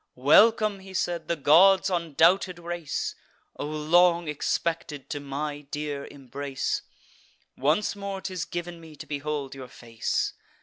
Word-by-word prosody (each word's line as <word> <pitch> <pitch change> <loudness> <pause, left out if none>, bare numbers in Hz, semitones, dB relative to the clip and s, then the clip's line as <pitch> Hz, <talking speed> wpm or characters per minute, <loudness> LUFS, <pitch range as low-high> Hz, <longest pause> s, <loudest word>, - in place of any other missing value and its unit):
"Welcome," 205 - +5
he 190 0 -11
said, 175 -2 -1
"the 170 - 0
gods' 185 +6 +5
undoubted 175 +2 +2
race! 170 -3 -4 0.4
O 145 - -4
long 170 +3 +3
expected 150 -1 -2
to 145 - -2
my 145 +1 -4
dear 145 -1 -4
embrace! 140 0 -4 0.7
Once 155 +12 +1
more 200 -1 -5
'tis 185 -4 -4
giv'n 175 0 -5
me 160 -2 -13
to - - -9
behold 145 -1 -4
your 135 -2 -9
face! 115 -2 -3
155 Hz, 130 wpm, -26 LUFS, 145-175 Hz, 0.7 s, Welcome